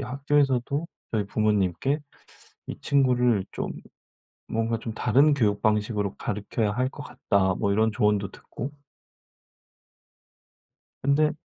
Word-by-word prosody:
학교에서도 140 +2 0 0.2
저희 105 -3 -1
부모님께 105 - +1 0.7
"이 - - -6
친구를 125 -6 +3
좀 - - -3 0.8
뭔가 115 +1 -1
좀 115 -1 -5
다른 135 +7 +4
교육 105 -7 +1
방식으로 105 -2 0
가르켜야 105 +1 -2
할 125 +5 0
것 145 +1 -9
같다." 95 -2 0
뭐 100 - 0
이런 110 +1 +2
조언도 105 -2 +1
듣고. 130 +5 -7 2.3
근데 150 +2 +3
115 Hz, 235 characters per minute, -26 LUFS, 105-135 Hz, 2.3 s, 다른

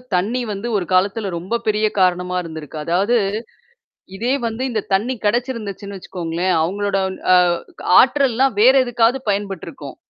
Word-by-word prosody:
தண்ணீ 220 +8 0
வந்து 200 +4 -4
ஒரு 185 - -2
காலத்துல 195 +3 +1
ரொம்ப 185 +7 -3
பெரிய 215 0 +2
காரணமா 180 0 +1
இருந்திருக்கு. 160 -2 -8
அதாவது, 195 +9 +1 1.0
இதே 235 +6 -1
வந்து, 230 +3 -4
இந்த 220 -2 -1
தண்ணீ 225 +7 +1
கெடச்சிருந்துச்சுன்னு 210 -4 -2
வச்சுக்கோங்களேன், 175 +1 -2
அவுங்களோட 200 +3 -1 0.4
அ - - +7 0.4
க - - -7 0.2
ஆற்றல்லாம் 265 -4 +3
வேற 255 +5 +7
எதுக்காவது 240 +2 +1
பயன்பட்டுருக்கும். 195 -3 -4
205 Hz, 130 wpm, -19 LUFS, 185-235 Hz, 1.0 s, அ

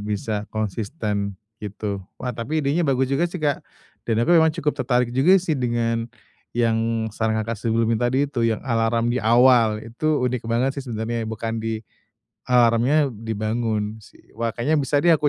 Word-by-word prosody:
bisa 105 0 -3
konsisten, 105 - -3 0.2
gitu. 105 -1 -4 0.2
Wah, 125 -1 -4
tapi 125 +8 -2
idenya 150 +3 +1
bagus 130 0 +1
juga 170 +6 +2
sih, 180 - -6
Kak. 150 -4 0 0.5
Dan 115 0 +2
aku 175 - +3
memang 160 -2 +6
cukup 150 -3 -1
tertarik 125 -1 +1
juga 145 +10 +5
sih, 180 -3 0
dengan 115 -3 -1 0.5
yang 115 -1 +1
saran 110 0 0
Kakak 115 -1 -4
sebelumnya 115 +1 +1
tadi 135 +3 +2
itu, 120 -4 0
yang 110 -2 -1
alarm 115 -1 +1
di 125 - 0
awal. 120 -1 +5
Itu 135 +5 -1
unik 125 -2 -2
banget 120 +4 +1
sih, - - -10
sebenernya, 115 +1 -2
ya. - - -6
Bukan 115 0 -3
di 110 0 -3 0.6
alarmnya 125 +4 +4
dibangun, 110 0 -2
sih. - - -20
Wah, 115 0 -1
kayaknya 145 +7 +1
bisa 140 +1 +1
deh, 170 - +6
aku 150 -2 +3
115 Hz, 175 wpm, -23 LUFS, 110-130 Hz, 0.6 s, memang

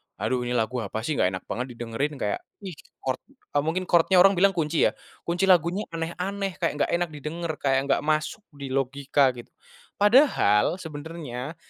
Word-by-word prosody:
"aduh 130 - -1
ini 125 - -1
lagu 120 +2 0
apa 110 0 -4
sih? 155 +3 -2
Nggak 95 +1 +2
enak 95 - -7
banget 125 0 -4
didengerin." 120 +6 -3
Kayak, 105 -6 -2 0.2
ih 190 - -5 0.3
chord 130 -1 -1
eee, 145 - -4
mungkin 180 +3 0
chord-nya 175 +1 +3
orang 195 - +7
bilang 195 0 +4
kunci 160 -1 +2
ya? - - -4 0.3
Kunci 175 +2 0
lagunya 180 +1 +3
aneh-aneh, 180 +4 -3
kayak 170 - 0 0.2
gak - - -5
enak 175 0 -1
didenger, 155 +3 -4
kayak 135 0 +1
nggak - - +3
masuk 155 +7 -1
di 140 -2 -7
logika 135 +1 +2
gitu. 120 - -11 0.5
Padahal 205 - +4
sebenarnya, 150 -4 -7
150 Hz, 175 wpm, -25 LUFS, 130-175 Hz, 0.5 s, orang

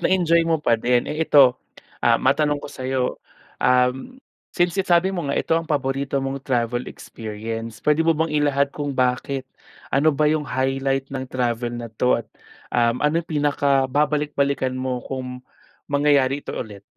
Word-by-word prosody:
na-enjoy 170 -3 +3
mo 165 -1 +2
pa 115 - +3
din. 120 +1 +2
Eh, 160 +1 -1
ito, 130 -3 +6 0.4
ah, 115 -1 +4
matanong 145 +4 +2
ko - - -7
sayo, 130 -1 -2 0.6
um, 125 - +1 0.4
since 175 0 +1
nasabi 185 0 +3
mo 175 -5 -3
nga, 140 - -1
ito - - 0
ang 165 - -6
paborito 140 -1 -1
mong 135 +1 -3
travel 120 -1 -1
experience, 115 +1 -7
pwede 150 +1 +3
mo 165 - +4
bang 160 +1 0
ilahad 140 -2 +2
kung 145 -2 -4
bakit? 130 +1 0 0.5
Ano 140 +4 +4
ba 150 +2 +2
yung 155 -1 -1
highlight 135 0 -1
ng 130 -1 -3
travel 120 -2 -1
na 120 -1 -6
'to 125 +3 +2
at, - - -35 0.5
um, 120 0 +2
ano 155 +3 +2
yung 170 - -30
pinakababalik 145 0 +1
balikan 140 -2 0
mo 130 -1 -3
kung 125 -1 -6 0.5
mangyayari 140 -1 +2
ito - - -6
ulit? 105 -4 -7
135 Hz, 165 wpm, -22 LUFS, 125-150 Hz, 0.6 s, ito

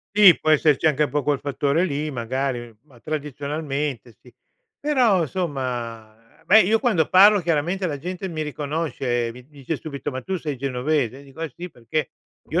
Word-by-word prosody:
Sì, 200 -4 +8
può 155 - +1
esserci 155 0 +3
anche 150 -1 +3
un 145 - -4
po’ 145 +2 0
col 145 +1 +1
fattore 145 +4 0
lì 150 -2 -2
magari, 120 -1 -3
ma 130 -5 -20
tradizionalmente 145 -2 -4
sì, 125 - -19 0.5
però 245 - +3
somma, 120 -8 -5
beh, 215 +5 +8
io 220 +5 +3
quando 190 - +2
parlo 200 +2 +7
chiaramente 175 +3 0
la 145 -4 -3
gente 180 +5 -5
mi 160 -4 -5
riconosce, 140 -5 -2
mi 125 +1 -14
dice 145 +1 -5
subito: 140 -2 -6
"Ma 130 -1 -5
tu 190 0 -2
sei 150 -5 -4
genovese?" 135 0 -1
Dico: 140 +3 -10
"Eh 160 -5 -4
sì", 180 +1 -8
perché 150 +5 -3 0.4
io - - +1
145 Hz, 170 wpm, -23 LUFS, 130-165 Hz, 0.5 s, Sì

